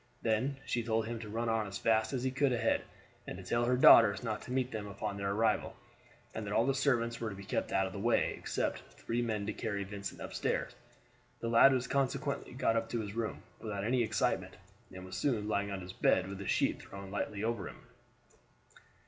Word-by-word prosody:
Then 120 +5 +1
she 120 - 0
told 110 -1 0
him 115 0 -4
to 110 -2 -7
run 115 +2 -2
on 110 -2 +1
as 100 - -5
fast 110 -1 +2
as 130 -3 -2
he 130 - 0
could 135 +1 +2
ahead, 120 - +2 0.5
and - - -5
to 95 - -9
tell 120 +6 +1
her 125 +1 +2
daughters 115 -3 +8
not 110 -3 -2
to - - -9
meet 130 0 0
them 105 -2 -4
upon 100 0 -4
their 100 0 -2
arrival, 110 +2 +1 0.6
and 110 - -4
that 100 0 -4
all 115 - +3
the 135 - +2
servants 120 -4 +1
were 115 - -1
to 100 - -7
be 100 - -9
kept 105 - -2
out 95 - +2
of 95 - -5
the 100 - -5
way, 115 +4 +2
except - - -2
three 120 +1 -2
men 110 -4 -1
to 110 - -2
carry 100 -3 -3
Vincent 100 0 -6
upstairs. - - -2 0.7
The 115 - -2
lad 120 +4 +7
was 130 -1 +1
consequently 140 +2 -1
got 120 -3 +1
up 115 0 0
to 115 - -1
his 100 -2 -6
room 115 -1 -3 0.2
without 100 -3 -4
any 120 +3 +2
excitement, 115 - 0 0.3
and 95 0 -9
was 95 - -7
soon 115 -7 0
lying 100 -1 0
on 100 -1 -4
his 90 +1 -8
bed 90 0 +2
with 100 0 -6
a 100 - -6
sheet - - +1
thrown 100 -1 -9
lightly 105 0 -3
over 115 -5 -2
him. - - -14
110 Hz, 225 wpm, -33 LUFS, 100-120 Hz, 0.7 s, daughters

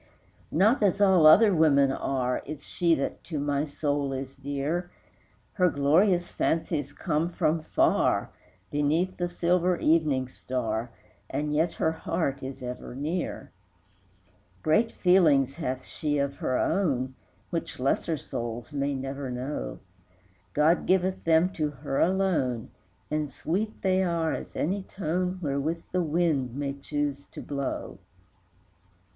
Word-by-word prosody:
Not 215 - +3
as 200 -1 +2
all 190 -6 +6
other 205 +6 +7
women 140 -5 +4
are 130 -2 -1
Is 150 -1 -7
she 170 -2 +2
that 135 - -3
to 160 - -4
my 145 0 0
soul 145 -2 -1
is 135 0 -5
dear; 145 +6 -3 0.6
Her 180 -2 +3
glorious 175 +6 +3
fancies 155 -3 -1
come 160 +2 -1
from 160 -2 0
far, - - +2 0.4
Beneath 155 +6 +1
the 175 - 0
silver 175 +1 +1
evening 150 -6 +2
star, 120 -3 -3 0.4
And 150 0 -2
yet 160 +3 +1
her 160 - +1
heart 160 -3 -2
is 135 0 -7
ever 125 0 -6
near. 160 +6 -3
II. 90 -1 -36 0.3
Great 220 +9 +3
feelings 155 -8 +4
hath 130 -5 -4
she 150 -1 -2
of 140 0 -1
her 130 - 0
own, 135 -9 0 0.4
Which 165 -6 -4
lesser 145 +5 0
souls 120 0 -5
may 140 0 -1
never 135 0 -4
know; 125 +4 -4 0.8
God 155 +4 +3
giveth 185 0 +1
them 165 +3 +4
to 155 -4 -1
her 140 -1 -3
alone, 170 -11 +1 0.4
And 150 -1 -1
sweet 195 - -3
they 190 0 +3
are 170 -3 0
as - - -6
any 195 +6 0
tone 185 0 -2
Wherewith 150 +4 -1
the 180 - +1
wind 155 -6 0
may 140 -1 -2
choose 140 0 -3
to - - -7
blow. 140 -1 -4
150 Hz, 135 wpm, -27 LUFS, 135-175 Hz, 0.8 s, other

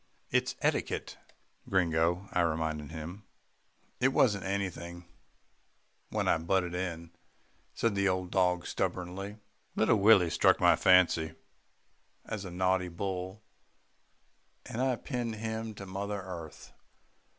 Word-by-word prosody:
"It's - - +1
etiquette, - - -1 0.5
Gringo," 85 0 +1
I 90 - +3
reminded 80 -2 -1
him. 80 +5 -7 0.8
"It 125 - +4
wasn't 105 -7 +2
anything 90 -3 -3 1.0
when - - -1
I - - +3
butted 90 +1 0
in," 85 -2 -4 0.6
said 115 -2 +1
the 100 0 +2
old 90 -1 -2
dog 90 -2 +2
stubbornly. 95 +4 -3 0.4
"Little 110 +1 +3
Willie 100 -4 +6
struck - - +4
my - - +6
fancy 90 -3 +4 0.9
as 105 -3 -5
a - - -5
naughty 90 +1 +1
bull, 95 +3 -4 1.2
and 115 - -4
I 130 -1 +2
pinned 120 -2 -4
him 110 0 -4
to 100 - -8
mother 100 +2 -4
earth. 85 -5 -9
95 Hz, 115 wpm, -31 LUFS, 85-100 Hz, 1.2 s, Willie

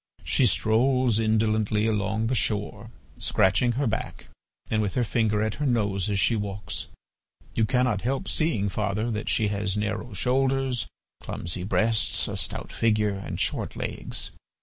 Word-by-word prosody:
She 130 - +3
strolls 120 +3 +3
indolently 110 -1 +2
along 110 0 0
the 120 - 0
shore, 105 -4 -1 0.3
scratching 120 +6 +3
her 140 +4 0
back 115 - -3 0.4
and 110 - +1
with 105 -2 -2
her 125 - +2
finger 110 -2 +1
at 110 -1 -1
her - - +1
nose 105 -6 +1
as 100 -1 +1
she 115 - +3
walks. 100 -1 -4 0.7
You 110 - +3
cannot 125 -5 +1
help 135 +3 -2
seeing, 120 -11 +1
father, 105 +3 -1
that 110 0 -3
she 110 -2 +2
has 100 -1 -1
narrow 105 +2 -3
shoulders, 130 +3 +1 0.3
clumsy 85 +1 -4
breasts, 110 +3 +1
a - - -4
stout - - -2
figure, 105 -2 +2
and 95 0 -5
short - - -1
legs. - - -3
110 Hz, 150 wpm, -26 LUFS, 105-120 Hz, 0.7 s, She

